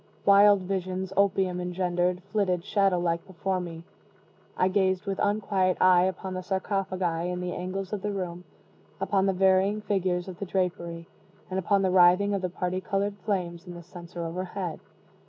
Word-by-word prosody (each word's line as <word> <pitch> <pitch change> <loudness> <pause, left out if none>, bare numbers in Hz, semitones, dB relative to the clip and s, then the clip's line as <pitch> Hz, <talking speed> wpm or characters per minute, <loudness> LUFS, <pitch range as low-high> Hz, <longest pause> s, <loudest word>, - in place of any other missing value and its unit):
Wild 200 0 +7
visions, 185 0 -3
opium 190 -2 +2
engendered, 180 0 -1
flitted, 185 -4 0
shadow 195 -3 +2
like, 170 -1 0
before 190 0 -2
me. 170 -2 -7 0.7
I 185 - +3
gazed 190 0 +1
with 195 -1 -3
unquiet 200 -3 +1
eye 180 -1 +6
upon 190 0 -3
the 185 - -3
sarcophagi 185 -3 -1
in 180 0 -3
the 180 0 -3
angles 185 +2 -4
of 205 - -2
the 210 - -2
room, 180 -3 -4 0.6
upon 195 -1 +1
the 195 - +2
varying 190 +2 +3
figures 185 -3 -1
of 180 -2 -8
the 200 - -3
drapery, 170 -3 -2 0.4
and 190 - 0
upon 195 +1 +2
the 190 - +2
writhing 185 +3 +5
of 200 - -1
the 185 - -1
parti 180 +1 -2
colored 200 +1 -1
fires 180 -3 -2
in 175 - -8
the 170 - -9
censer 175 0 -8
overhead. 180 0 -4
185 Hz, 170 wpm, -27 LUFS, 180-195 Hz, 0.7 s, Wild